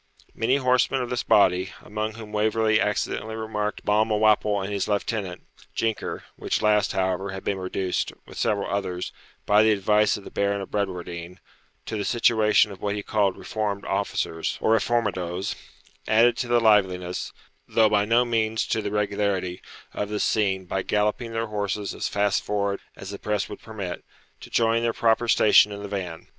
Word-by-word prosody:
Many 120 +4 +1
horsemen 130 0 +2
of 120 - -6
this 125 - 0
body, 95 -2 +3
among 110 +1 -3
whom 110 -2 -9
Waverley 110 +1 +2
accidentally 110 +1 -1
remarked 105 -1 -3
Balmawhapple 105 -1 +3
and 100 +2 -4
his 100 - -1
lieutenant, 100 -3 -2 0.3
Jinker 115 -2 -2
(which - - -2
last, 105 0 +3
however, 95 +1 -1
had 95 -1 -6
been 100 -1 -1
reduced, 95 0 -2
with - - -10
several 100 -1 0
others, 90 -3 -3 0.3
by 105 +1 +5
the 110 - +4
advice 105 +1 +3
of 100 - -11
the - - -10
Baron 100 0 0
of 95 - -7
Bradwardine, 90 -3 -4 0.5
to 110 - -4
the 105 - -2
situation 110 -2 +3
of 95 - -11
what 100 0 -1
he 105 - -4
called 100 -3 +1
reformed 105 -2 -3
officers, 80 0 -2
or 110 - +2
reformadoes), 100 -6 0 0.5
added 115 +2 +5
to 125 - -2
the 120 0 +3
liveliness, 95 -5 +2 0.4
though 110 -1 +4
by 105 -1 +3
no 120 +3 +3
means 110 -2 0
to 110 - +1
the - - -3
regularity, 100 -3 -1 0.3
of 105 - -3
the 105 0 -2
scene, 95 -3 +1
by 95 +1 -2
galloping 105 +4 0
their 115 0 -1
horses 105 -2 -3
as - - -3
fast 100 -1 +1
forward 100 -1 -1 0.2
as 95 0 -8
the 100 - -7
press 105 -1 -1
would - - -9
permit, 100 -5 -6 0.4
to - - -11
join 115 0 +2
their 115 -1 0
proper 115 +1 +2
station 105 -2 +6
in 100 0 -7
the - - -4
van. 90 -5 -5
105 Hz, 175 wpm, -25 LUFS, 100-110 Hz, 0.5 s, station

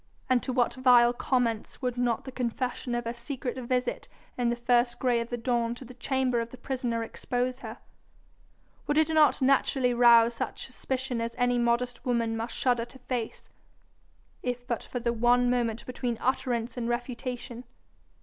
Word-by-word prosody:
And 250 -1 +4
to 260 - -3
what 245 -1 +2
vile 245 -2 +5
comments 240 -3 -1
would 250 -1 0
not 245 -2 0
the 265 - -6
confession 250 0 -2
of 240 0 -2
her 230 - -2
secret 245 +1 -5
visit 250 0 -2 0.3
in 245 -1 +1
the 240 - +1
first 240 0 +2
grey 245 -2 +2
of 230 0 -4
the 240 - -2
dawn 235 -1 0
to 260 - -10
the 255 - -11
chamber 255 -1 0
of 230 - -5
the 255 - -11
prisoner 245 -4 -2
expose 250 +2 -2
her? - - -8 1.1
Would 295 - +1
it 315 0 +4
not 310 -3 +4
naturally 260 -1 +3
rouse 235 -1 +6
such 230 - -4
suspicion 260 -1 -3
as 230 0 -3
any 245 -1 +2
modest 240 +1 0
woman 230 -2 0
must 225 +1 -4
shudder 245 -2 +1
to 240 +2 -15
face, 250 -3 -4 1.0
if 245 -1 -3
but 235 -3 -2
for 245 - -5
the 235 0 0
one 245 +1 +3
moment 235 -2 -1
between 245 -2 -3
utterance 245 -2 -1
and 235 -1 -2
refutation. 245 0 -4
245 Hz, 175 wpm, -28 LUFS, 235-255 Hz, 1.1 s, rouse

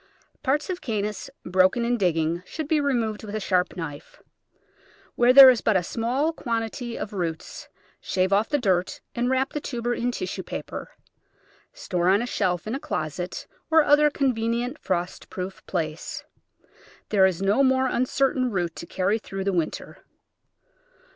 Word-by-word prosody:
Parts 290 +2 0
of 360 - -5
Cannas 210 0 -3 0.2
broken 185 +6 +3
in 240 +1 +1
digging 170 -4 0
should 310 - -6
be 305 -1 +2
removed 230 -7 -1
with 210 0 -6
a - - -1
sharp 185 -2 0
knife. 150 -4 -8 0.9
Where 240 +1 +4
there 265 0 +11
is 240 - -1
but 215 -3 +3
a 180 - 0
small 250 - -1
quantity 230 -2 -3
of 210 - -5
roots, 165 -4 -5 0.3
shave 185 +1 0
off 205 +3 +2
the 290 - +2
dirt 185 -8 0
and 240 +1 0
wrap 260 +1 0
the 295 - -3
tuber 240 -3 -2
in 240 +1 -1
tissue 365 +9 -4
paper. - - -6 0.8
Store 180 - -1
on 200 +4 +4
a - - -2
shelf 185 -7 -1
in 215 - -3
a 270 - -2
closet, 175 - -4 0.2
or 320 -1 +6
other 295 +1 +5
convenient 245 -1 -1
frost 180 -1 -3
proof 185 +1 -6
place. 160 -3 -4 0.9
There 195 -3 +5
is 185 -3 -2
no 200 +7 +3
more 260 -1 +3
uncertain 255 0 +1
root 175 -6 -2
to 170 - -7
carry 200 +4 0
through 195 -2 -6
the 195 0 0
winter. 170 -3 -3
220 Hz, 160 wpm, -25 LUFS, 185-260 Hz, 0.9 s, there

